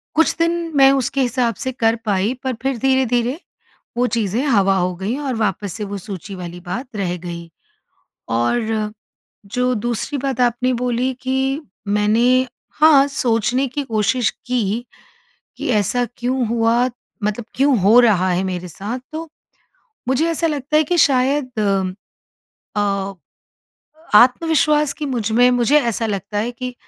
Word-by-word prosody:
कुछ 320 Hz, 0 st, +3 dB
दिन 335 Hz, 0 st, 0 dB
मैं 270 Hz, 0 st, +7 dB
उसके 270 Hz, 0 st, 0 dB
हिसाब 245 Hz, -2 st, 0 dB
से 260 Hz, -, -1 dB
कर 230 Hz, -3 st, +1 dB
पाई 205 Hz, +2 st, +1 dB
पर 260 Hz, -1 st, -1 dB
फिर 270 Hz, -1 st, -1 dB
धीरे-धीरे 255 Hz, +1 st, +1 dB, 0.6 s
वो 245 Hz, +1 st, +2 dB
चीज़ें 225 Hz, -1 st, -1 dB
हवा 195 Hz, -7 st, +3 dB
हो 180 Hz, -1 st, 0 dB
गईं 205 Hz, +9 st, -3 dB
और 280 Hz, -3 st, -3 dB
वापस 205 Hz, -3 st, -1 dB
से 210 Hz, -, -5 dB
वो 200 Hz, 0 st, -5 dB
सूची 195 Hz, -1 st, -8 dB
वाली 175 Hz, -1 st, -7 dB
बात 210 Hz, +8 st, -6 dB
रह 180 Hz, -3 st, -2 dB
गई। 170 Hz, -1 st, -8 dB, 0.8 s
और 215 Hz, -, 0 dB, 0.5 s
जो 250 Hz, +5 st, 0 dB
दूसरी 240 Hz, +5 st, -2 dB
बात 270 Hz, -2 st, -3 dB
आपने 245 Hz, +1 st, +1 dB
बोली 250 Hz, +1 st, -1 dB
कि 265 Hz, +2 st, -1 dB, 0.3 s
मैंने 230 Hz, +5 st, +3 dB, 0.3 s
हाँ, 300 Hz, -3 st, +6 dB
सोचने 250 Hz, 0 st, 0 dB
की 285 Hz, +3 st, -4 dB
कोशिश 225 Hz, 0 st, +1 dB, 0.2 s
की, 240 Hz, -2 st, -1 dB, 0.7 s
कि -, -, -4 dB
ऐसा 220 Hz, +3 st, +1 dB
क्यों 250 Hz, +1 st, 0 dB
हुआ, 230 Hz, +1 st, +2 dB, 0.4 s
मतलब 210 Hz, +2 st, -2 dB
क्यों 275 Hz, -1 st, +3 dB
हो 210 Hz, +6 st, +6 dB
रहा 200 Hz, -6 st, +4 dB
है 180 Hz, +1 st, 0 dB
मेरे 180 Hz, -1 st, -4 dB
साथ, 205 Hz, +9 st, -5 dB
तो 320 Hz, +1 st, -6 dB, 0.8 s
मुझे 265 Hz, +5 st, +2 dB
ऐसा 330 Hz, 0 st, 0 dB
लगता 295 Hz, -1 st, 0 dB
है 310 Hz, -, +4 dB
कि 350 Hz, +4 st, -1 dB
शायद 260 Hz, -3 st, +2 dB, 1.2 s
अ, 200 Hz, -1 st, -1 dB, 1.0 s
आत्मविश्वास 300 Hz, +3 st, +3 dB
की 300 Hz, -, -3 dB
मुझ 235 Hz, -5 st, -2 dB
में 245 Hz, +2 st, +5 dB
मुझे 245 Hz, +4 st, +3 dB
ऐसा 230 Hz, -3 st, -1 dB
लगता 205 Hz, 0 st, -3 dB
है 225 Hz, +3 st, -1 dB
कि 250 Hz, +1 st, -6 dB
240 Hz, 145 wpm, -19 LUFS, 210-265 Hz, 1.2 s, मैं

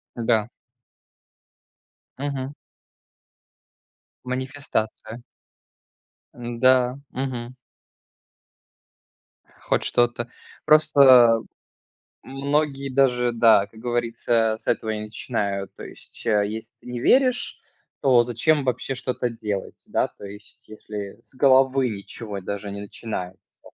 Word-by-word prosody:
Да. 115 Hz, -2 st, +1 dB, 1.7 s
Мгм. 140 Hz, -1 st, -3 dB, 1.7 s
Манифестация. 125 Hz, -3 st, -3 dB, 1.1 s
Да. 125 Hz, +2 st, +2 dB
Мгм. 125 Hz, -2 st, -4 dB, 2.1 s
Хоть -, -, 0 dB
что-то. 120 Hz, 0 st, +1 dB, 0.3 s
Просто 135 Hz, -7 st, +6 dB, 0.8 s
многие 140 Hz, 0 st, -1 dB
даже, 125 Hz, -2 st, +2 dB
да, 115 Hz, -3 st, +5 dB
как 110 Hz, +2 st, -16 dB
говорится, 115 Hz, -1 st, 0 dB
с -, -, -25 dB
этого 110 Hz, -, 0 dB
и 105 Hz, -1 st, -3 dB
начинают. 105 Hz, -2 st, -3 dB
То -, -, -10 dB
есть, -, -, -11 dB
э, 105 Hz, -2 st, +3 dB
если 110 Hz, +1 st, -8 dB
ты -, -, -15 dB
не 125 Hz, -1 st, -4 dB
веришь, 255 Hz, -, +2 dB, 0.4 s
то 125 Hz, -3 st, +5 dB
зачем 135 Hz, +6 st, +1 dB
вообще 130 Hz, +1 st, -2 dB
что-то 125 Hz, -1 st, -2 dB
делать, 105 Hz, -4 st, -5 dB
да, -, -, +1 dB
то -, -, -13 dB
есть 100 Hz, +1 st, -13 dB
если 105 Hz, -2 st, -8 dB
с -, -, -18 dB
головы 135 Hz, -1 st, +4 dB
ничего 105 Hz, 0 st, -7 dB
даже 100 Hz, +2 st, -5 dB
не 100 Hz, 0 st, -6 dB
начинается, 95 Hz, -4 st, -8 dB
120 Hz, 100 wpm, -24 LUFS, 110-130 Hz, 2.1 s, Просто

